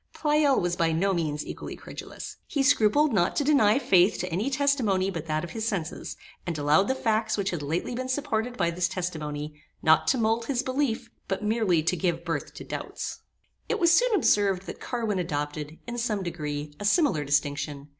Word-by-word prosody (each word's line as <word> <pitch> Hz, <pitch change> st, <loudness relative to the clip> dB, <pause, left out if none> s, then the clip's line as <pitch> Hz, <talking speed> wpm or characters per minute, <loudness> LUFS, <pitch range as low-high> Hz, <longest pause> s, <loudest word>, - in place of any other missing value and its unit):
Pleyel 295 Hz, -2 st, +3 dB
was 175 Hz, -1 st, 0 dB
by 165 Hz, -2 st, +1 dB
no 190 Hz, +5 st, +1 dB
means 155 Hz, -4 st, -2 dB
equally -, -, -7 dB
credulous. -, -, -9 dB
He 280 Hz, -2 st, 0 dB
scrupled 280 Hz, +2 st, +4 dB
not 175 Hz, -3 st, +2 dB
to 290 Hz, -, +1 dB
deny 270 Hz, -7 st, +4 dB
faith 190 Hz, -7 st, +4 dB
to 180 Hz, 0 st, -4 dB
any 200 Hz, +10 st, 0 dB
testimony 260 Hz, -9 st, +1 dB
but 165 Hz, -3 st, -5 dB
that 155 Hz, 0 st, -1 dB
of 175 Hz, -, -6 dB
his 225 Hz, -1 st, -3 dB
senses, 180 Hz, -7 st, -3 dB, 0.3 s
and 170 Hz, -3 st, -3 dB
allowed 150 Hz, +7 st, +3 dB
the 265 Hz, -, +1 dB
facts 220 Hz, -3 st, 0 dB
which 195 Hz, -1 st, 0 dB
had 175 Hz, -4 st, -3 dB
lately 160 Hz, +10 st, -2 dB
been 255 Hz, +1 st, -4 dB
supported 245 Hz, -3 st, -1 dB
by 170 Hz, -3 st, +1 dB
this 180 Hz, +1 st, 0 dB
testimony, 150 Hz, -5 st, -4 dB, 0.2 s
not 160 Hz, 0 st, +5 dB
to 265 Hz, -, +3 dB
mould 225 Hz, 0 st, +1 dB
his 260 Hz, -1 st, -1 dB
belief, 260 Hz, -3 st, -1 dB, 0.2 s
but 195 Hz, +1 st, -2 dB
merely 210 Hz, -7 st, +2 dB
to 165 Hz, -, +1 dB
give 170 Hz, -1 st, -1 dB
birth 165 Hz, -4 st, -3 dB
to -, -, -8 dB
doubts. -, -, -5 dB, 0.5 s
It -, -, +1 dB
was 340 Hz, -1 st, +4 dB
soon 480 Hz, +5 st, +4 dB
observed 200 Hz, -, +3 dB
that -, -, -7 dB
Carwin 225 Hz, -6 st, -2 dB
adopted, 150 Hz, -2 st, -3 dB
in 240 Hz, 0 st, -4 dB
some 215 Hz, -4 st, -1 dB
degree, 150 Hz, -4 st, -4 dB
a 205 Hz, -, -4 dB
similar 205 Hz, -, +3 dB
distinction. 145 Hz, 0 st, -1 dB
195 Hz, 195 wpm, -27 LUFS, 160-240 Hz, 0.5 s, not